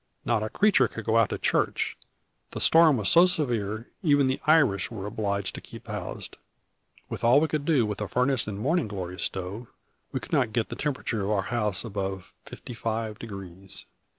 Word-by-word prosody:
Not 115 -3 +1
a 110 - -2
creature 200 - +3
could 115 -1 -8
go 110 0 +2
out 115 -2 +4
to - - -3
church, - - 0 0.6
the - - -4
storm 160 -4 +6
was 105 - 0
so 170 +2 +7
severe: 115 - -1
even 145 -6 +4
the 130 0 -1
Irish 145 -11 +4
were 105 -5 -6
obliged 100 -2 -2
to - - -7
keep - - -12
housed. - - -6 0.7
With - - -6
all 120 +4 +6
we 160 - +2
could 150 -1 -2
do 145 -8 +3
with 105 0 -4
a 105 - -2
furnace 125 0 +1
and 100 -2 -4
morning 145 - +1
glory 90 -3 -6
stove, 95 +6 -3 0.4
we - - -2
could - - -11
not 110 - +2
get 115 -2 0
the - - -5
temperature 130 -7 -2
of 100 - -2
our 100 -3 +1
house 105 -3 0
above 95 -3 -4
fifty 125 - -9
five 110 -1 -3
degrees." 95 -3 -8
110 Hz, 195 wpm, -27 LUFS, 100-135 Hz, 0.7 s, so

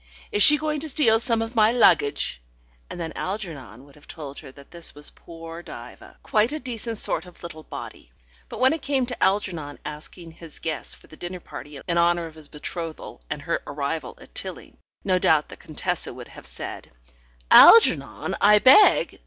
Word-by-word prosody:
Is 205 - 0
she 300 +6 +8
going 305 0 -2
to 315 +2 -5
steal 230 -6 +3
some 230 -1 +1
of 225 +1 -7
my 220 0 +5
luggage?" 160 - +2 0.5
And - - -8
then 165 -1 -5
Algernon 145 - -6
would 140 - -19
have 150 - -19
told 145 -4 -8
her - - -12
that 140 +1 -17
this 170 -3 -6
was 145 0 -6
poor 165 0 -11
Diva, 120 -7 -12
quite 220 +4 +2
a 305 - -4
decent 235 -3 -4
sort 190 - 0
of 180 - -15
little 165 -2 -8
body. - - -10 0.4
But - - -8
when 260 +3 +4
it 320 - -4
came 270 -3 0
to 245 0 -4
Algernon 180 -7 -1
asking 160 +3 -8
his 165 -1 -11
guests 160 -3 -4
for - - -21
the 155 - -15
dinner 180 +1 -6
party 145 -3 -10
in 170 0 +1
honour 170 0 +2
of 165 - -10
his 155 -2 -14
betrothal 160 - -7
and - - -5
her - - -2
arrival 145 +2 -4
at - - -16
Tilling, - - -9 0.3
no 185 -2 +1
doubt 155 -4 +2
the - - -10
Contessa 175 +2 -4
would 125 -1 -11
have - - -12
said, - - -7 0.6
"Algernon, 455 - +7
I 210 +1 +7
beg 260 - +5
170 Hz, 190 wpm, -24 LUFS, 150-225 Hz, 0.6 s, she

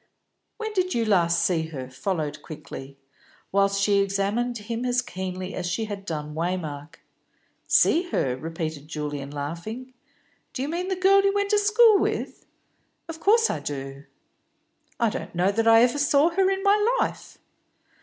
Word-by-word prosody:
"When 440 -1 -4
did 370 -2 0
you 230 -1 +1 0.2
see 170 -1 +1
her 150 -5 -7
last?" 130 0 -12
followed 170 -8 -2
quickly, 140 -3 -9 0.5
whilst 200 0 +2
she 200 0 +3
examined 200 +5 0
him 230 +3 -5
as 250 0 +1
keenly 185 -4 -5
as 180 -1 -3
she 175 +6 -2
had 200 -2 -7
done 150 -4 -5
Waymark. 160 -2 -4 0.7
"See 350 +2 +3
her?" 125 - 0
repeated 160 0 -5
Julian, 145 -2 -5
laughing. 170 - -6 0.6
"Do 260 - -3
you 285 - -3
mean 350 +3 -3
the 380 - -1
girl 385 +2 +5
you 395 0 +2
went 405 0 0
to 420 - +4
school 425 0 +5
with?" - - -3 0.6
"Of 325 -1 -7
course 450 +6 +4
I - - -3
do." 135 0 -6 0.9
"I 230 -3 +2
don't - - -6
know 180 +3 +2
that 225 +2 0
I 225 +1 +7
ever 250 +4 +1
saw 285 +2 +4
her 380 +2 +2
in 390 0 -1
my 420 +4 +3
life." - - -3
200 Hz, 165 wpm, -25 LUFS, -, 0.9 s, I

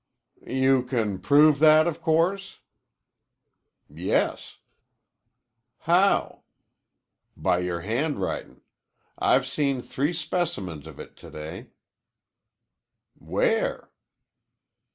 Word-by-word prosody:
"You 130 +1 +2
can 115 -7 -2
prove 145 +2 +4
that, 155 0 +6
o' 170 - 0
course." 170 +6 -1 1.3
"Yes." - - -2 1.2
"How?" 180 +4 +2 1.0
"By 90 - +1
your 90 -1 -3
handwritin'. 125 - -3 0.6
I've - - +3
seen 140 -4 -1
three 145 +6 -2
specimens 100 - -3
of 80 - -12
it - - -11
to - - -13
day." 75 +1 -8 1.5
"Where?" - - -1
140 Hz, 80 wpm, -25 LUFS, 100-160 Hz, 1.5 s, that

